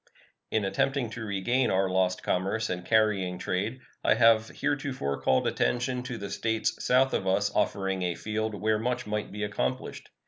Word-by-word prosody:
In 110 Hz, -2 st, 0 dB
attempting 125 Hz, +4 st, 0 dB
to 115 Hz, -1 st, -6 dB
regain 110 Hz, +5 st, +1 dB
our 95 Hz, +1 st, +2 dB
lost 90 Hz, 0 st, +1 dB
commerce 100 Hz, +5 st, 0 dB
and 90 Hz, 0 st, -3 dB
carrying 100 Hz, -4 st, +2 dB
trade 105 Hz, +10 st, -2 dB, 0.2 s
I -, -, +4 dB
have 115 Hz, -1 st, +5 dB
heretofore 130 Hz, -, -2 dB
called 65 Hz, -2 st, +2 dB
attention 125 Hz, +1 st, 0 dB
to 125 Hz, -1 st, -5 dB
the 100 Hz, -2 st, -6 dB
States 110 Hz, +1 st, -1 dB
south 130 Hz, +1 st, +3 dB
of 95 Hz, -, -1 dB
us 100 Hz, +2 st, +2 dB
offering 95 Hz, -1 st, 0 dB
a 90 Hz, -1 st, -1 dB
field 110 Hz, +1 st, -3 dB
where 105 Hz, +2 st, +1 dB
much 125 Hz, +2 st, -1 dB
might 105 Hz, 0 st, -3 dB
be 105 Hz, +1 st, -4 dB
accomplished. 105 Hz, +5 st, -3 dB
105 Hz, 170 wpm, -28 LUFS, 95-120 Hz, 0.2 s, have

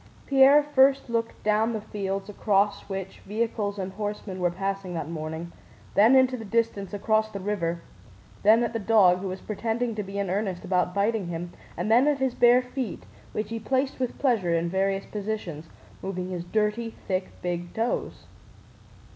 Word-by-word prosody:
Pierre 275 Hz, +2 st, +6 dB
first 270 Hz, -3 st, +3 dB
looked 230 Hz, 0 st, -2 dB
down 215 Hz, +2 st, +2 dB
the 220 Hz, -, -2 dB
field 195 Hz, -2 st, -4 dB
across 200 Hz, 0 st, +1 dB
which 195 Hz, -1 st, -5 dB
vehicles 210 Hz, -1 st, -2 dB
and 190 Hz, -1 st, -4 dB
horsemen 205 Hz, -2 st, -4 dB
were 180 Hz, -1 st, +2 dB
passing 195 Hz, 0 st, -3 dB
that 160 Hz, -, -3 dB
morning, 160 Hz, +1 st, -5 dB, 0.4 s
then 220 Hz, +6 st, +6 dB
into 260 Hz, -1 st, +5 dB
the 230 Hz, -, -7 dB
distance 220 Hz, -3 st, -1 dB
across 215 Hz, +1 st, +1 dB
the 200 Hz, -, -6 dB
river, 175 Hz, -4 st, -2 dB, 0.6 s
then 220 Hz, +3 st, +5 dB
at 235 Hz, -, -2 dB
the 230 Hz, -, -1 dB
dog 200 Hz, -4 st, +5 dB
who 195 Hz, -, -4 dB
was 185 Hz, 0 st, -5 dB
pretending 230 Hz, +2 st, -2 dB
to 215 Hz, -, -3 dB
be 195 Hz, 0 st, -6 dB
in 200 Hz, -1 st, -1 dB
earnest 190 Hz, 0 st, -2 dB
about 180 Hz, -1 st, +1 dB
biting 205 Hz, -1 st, +1 dB
him, 175 Hz, +1 st, -5 dB, 0.2 s
and 215 Hz, -, -1 dB
then 245 Hz, +5 st, +6 dB
at 295 Hz, -1 st, +3 dB
his 265 Hz, -2 st, 0 dB
bare 245 Hz, +1 st, +5 dB
feet 250 Hz, -1 st, -5 dB, 0.3 s
which 215 Hz, -, -3 dB
he 230 Hz, -, -2 dB
placed 265 Hz, +5 st, -1 dB
with 255 Hz, -2 st, -2 dB
pleasure 215 Hz, -11 st, +2 dB
in 165 Hz, +1 st, 0 dB
various 195 Hz, +1 st, 0 dB
positions, 195 Hz, -7 st, -5 dB, 0.3 s
moving 185 Hz, -1 st, -4 dB
his 175 Hz, -1 st, -4 dB
dirty 215 Hz, +4 st, -1 dB
thick 185 Hz, -1 st, -1 dB
big 175 Hz, -1 st, -3 dB
toes. 230 Hz, +2 st, -2 dB
205 Hz, 175 wpm, -26 LUFS, 185-230 Hz, 0.6 s, Pierre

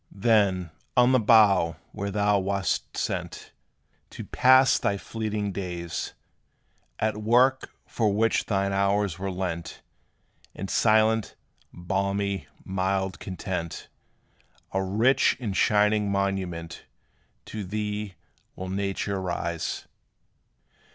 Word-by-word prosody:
Then, 95 Hz, -5 st, +2 dB, 0.3 s
on 125 Hz, +1 st, +6 dB
the 130 Hz, -, +5 dB
bough 105 Hz, -7 st, +5 dB, 0.2 s
where 100 Hz, -1 st, -4 dB
thou 105 Hz, 0 st, +2 dB
wast 95 Hz, 0 st, -2 dB
sent -, -, -4 dB, 0.6 s
To -, -, -8 dB
pass 130 Hz, +1 st, +5 dB
thy 100 Hz, -, 0 dB
fleeting 105 Hz, -1 st, -3 dB
days, 90 Hz, -3 st, -5 dB, 0.8 s
At 110 Hz, -1 st, -1 dB
work 125 Hz, +4 st, +3 dB, 0.2 s
for 110 Hz, -3 st, 0 dB
which 115 Hz, +3 st, +1 dB
thine 100 Hz, -1 st, 0 dB
hours 100 Hz, -2 st, +1 dB
were 95 Hz, +1 st, -3 dB
lent, 90 Hz, -3 st, -4 dB, 0.7 s
In 95 Hz, -, -5 dB
silent, 110 Hz, 0 st, +2 dB, 0.4 s
balmy, 100 Hz, -1 st, -2 dB, 0.2 s
mild 95 Hz, -1 st, -1 dB
content, 90 Hz, -3 st, -5 dB, 0.8 s
A 95 Hz, -, +1 dB
rich 115 Hz, +8 st, +2 dB
and 105 Hz, -7 st, -3 dB
shining 105 Hz, +1 st, +3 dB
monument 95 Hz, -4 st, -2 dB, 0.6 s
To 110 Hz, -1 st, -6 dB
thee 105 Hz, 0 st, -4 dB, 0.4 s
will 95 Hz, 0 st, -6 dB
nature 100 Hz, 0 st, -2 dB
raise. 85 Hz, -2 st, -3 dB
100 Hz, 105 wpm, -26 LUFS, 95-105 Hz, 0.8 s, on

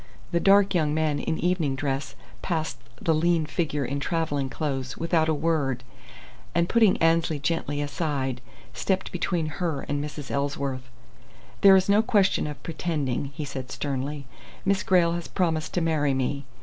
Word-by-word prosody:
The 170 Hz, -, +2 dB
dark 200 Hz, +2 st, +5 dB
young 155 Hz, -4 st, +1 dB
man 155 Hz, -2 st, +1 dB
in 160 Hz, -, -1 dB
evening 170 Hz, -6 st, 0 dB
dress 135 Hz, 0 st, -3 dB, 0.3 s
passed 160 Hz, -7 st, -2 dB, 0.2 s
the 165 Hz, -, +2 dB
lean 165 Hz, 0 st, +2 dB
figure 150 Hz, -3 st, -1 dB
in 140 Hz, +3 st, -2 dB
travelling 145 Hz, -3 st, -1 dB
clothes 135 Hz, -4 st, -3 dB
without 165 Hz, -1 st, +1 dB
a -, -, +3 dB
word 145 Hz, -5 st, 0 dB, 0.7 s
and, 170 Hz, 0 st, +3 dB
putting 225 Hz, -3 st, +4 dB
Annesley 165 Hz, -1 st, +2 dB
gently 145 Hz, 0 st, -1 dB
aside, 140 Hz, -4 st, -2 dB, 0.3 s
stepped 190 Hz, -1 st, -1 dB
between 175 Hz, -2 st, -1 dB, 0.2 s
her 160 Hz, -6 st, 0 dB
and 145 Hz, 0 st, -2 dB
Mrs. 150 Hz, -1 st, -7 dB
Ellsworth. 140 Hz, -2 st, -2 dB, 0.7 s
"There 195 Hz, -1 st, +9 dB
is 190 Hz, -1 st, +3 dB
no 205 Hz, +1 st, +5 dB
question 200 Hz, -7 st, +2 dB
of 150 Hz, -, -8 dB
'pretending'," 150 Hz, -6 st, -2 dB
he 155 Hz, -, -4 dB
said, 130 Hz, -2 st, -6 dB
sternly. 140 Hz, +1 st, -3 dB, 0.4 s
"Miss 195 Hz, 0 st, +2 dB
Grayle 175 Hz, -3 st, +3 dB
has 170 Hz, -1 st, -4 dB
promised 160 Hz, -3 st, -1 dB
to 175 Hz, -, +2 dB
marry 150 Hz, -4 st, +1 dB
me. 135 Hz, +2 st, -1 dB
155 Hz, 160 wpm, -26 LUFS, 140-170 Hz, 0.7 s, There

